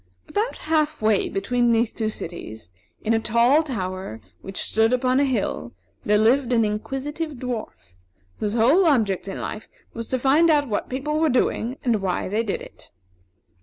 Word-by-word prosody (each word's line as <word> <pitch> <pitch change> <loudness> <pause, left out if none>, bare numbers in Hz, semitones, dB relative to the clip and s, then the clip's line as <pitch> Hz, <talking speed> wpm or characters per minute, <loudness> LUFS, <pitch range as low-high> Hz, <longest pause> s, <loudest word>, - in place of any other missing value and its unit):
About 435 +4 -2
half 310 -1 +1
way 215 -2 +2
between 240 +5 +1
these 230 0 +2
two 220 -2 -1
cities, 110 - -8 0.3
in 225 - +1
a 225 - +3
tall 235 +7 +4
tower 185 - -4 0.2
which 195 0 -8
stood 225 +2 +2
upon 255 +1 +2
a - - +4
hill, 225 - -2 0.3
there 210 0 +3
lived 245 +4 +3
an 230 -2 +3
Inquisitive 270 +9 -3
Dwarf, 240 - -6 0.5
whose 210 +1 -1
whole 280 +11 +4
object 215 - +1
in 195 - -5
life 215 - -5 0.3
was 230 0 -5
to 260 - 0
find 280 +6 +4
out 295 -2 +3
what 210 -3 -2
people 295 +4 -2
were 320 -1 +3
doing 250 -1 0
and 230 -6 +1
why 185 -2 -1
they 210 +4 0
did 215 -4 -3
it. - - -14
235 Hz, 170 wpm, -23 LUFS, 210-275 Hz, 0.5 s, tall